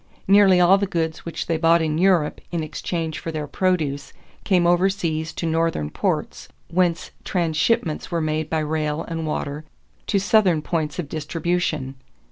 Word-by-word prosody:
Nearly 195 -2 +6
all 180 +3 +6
the 200 - 0
goods 160 -3 -2
which 170 - -4
they 165 - 0
bought 165 +1 +4
in 155 -1 -1
Europe 180 -5 +2
in 170 -2 -2
exchange 160 +2 -4
for 165 - -5
their 155 -2 -3
produce 150 -4 -1 0.3
came 180 -4 +2
overseas 175 -3 +1
to - - -4
Northern 165 - 0
ports, - - -2 0.2
whence 175 -1 0
transshipments 165 0 0
were 170 - -1
made 155 -1 -1
by 160 -1 0
rail 155 0 -1
and 165 -1 -4
water 150 0 -3 0.4
to 205 - +1
Southern 195 -5 +3
points 155 -1 -2
of 175 -5 -3
distribution. 155 -2 -2
165 Hz, 155 wpm, -22 LUFS, 155-180 Hz, 0.4 s, Nearly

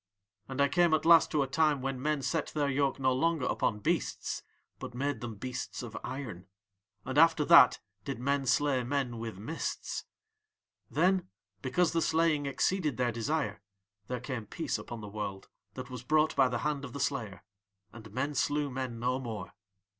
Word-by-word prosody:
"And 135 0 -5
I 140 - +5
came 170 +2 +4
at 155 - -2
last 165 -1 +7
to 150 -2 +2
a - - -3
time 150 +1 +2
when 130 0 -3
men 150 -1 0
set 165 +1 0
their 145 -2 0
yoke 140 0 +1
no 130 -1 +3
longer 160 +2 +1
upon 105 -1 0
beasts - - -1 0.4
but - - -7
made 140 +2 -2
them 120 -2 -5
beasts 125 +3 -5
of 115 -2 -8
iron. 115 -10 -6 0.6
"And 130 +3 +1
after 165 -2 +5
that 170 -7 +8 0.2
did 135 - -4
men 135 +2 0
slay 135 -1 +2
men 125 -2 -2
with 115 -4 -5
mists. 135 +12 -4 0.8
"Then, 185 -1 +2 0.3
because 165 +6 +1
the 165 - +2
slaying 160 -2 +2
exceeded 150 0 0
their 125 -1 +1
desire, 115 -3 -2 0.5
there 125 -1 -3
came 120 -3 -5
peace - - -2
upon 120 -2 -7
the 105 - -7
world 100 -2 -5 0.3
that 130 -1 -7
was 125 -2 -6
brought 155 +4 +2
by 135 - +5
the 120 -1 -1
hand 150 -2 -1
of 125 -4 -7
the 140 - -5
slayer, 120 -9 -2 0.5
and 110 -3 -11
men 130 +6 -2
slew 145 +2 0
men 130 -2 -4
no 125 +2 0
more. 110 -7 -6
135 Hz, 180 wpm, -31 LUFS, 120-150 Hz, 0.8 s, that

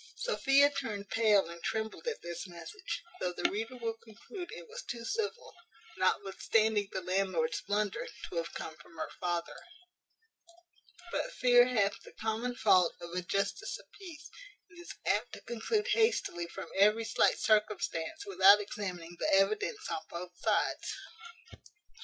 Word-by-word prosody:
Sophia 285 - +4
turned 205 -7 -4
pale 210 -5 +4
and 170 0 -9
trembled 220 - -3
at 470 - -3
this 175 +2 -5
message, 335 - -6 0.2
though 180 - -1
the - - +1
reader 225 +5 -3
will 230 -2 -2
conclude 345 - -9
it 480 - -9
was 475 +2 -7
too 235 - -6
civil, 445 - -3 0.4
notwithstanding 205 +2 +2
the 190 - -3
landlord's 180 -3 0
blunder, 205 -1 -1 0.2
to 175 - -6
have 165 0 -2
come 160 - -5
from 150 +2 -17
her 155 - -4
father; 175 -1 -2 1.5
but - - -1
fear 245 - +6
hath 205 -5 +1
the - - -14
common 225 +3 -2
fault 180 -7 +4
of 170 0 -8
a 180 +1 -1
justice 195 +3 -1
of - - -16
peace, 315 -6 -10 0.4
and 340 - -14
is 345 - -9
apt - - +1
to - - -8
conclude 400 - -1
hastily 445 - +2
from 190 +2 -8
every 210 +3 +5
slight 225 - +3
circumstance, 210 -6 0
without 195 +1 +7
examining 185 -5 -5
the - - +1
evidence 210 - +2
on - - -1
both 175 +1 -6
sides. - - 0
210 Hz, 150 wpm, -32 LUFS, 180-250 Hz, 1.5 s, without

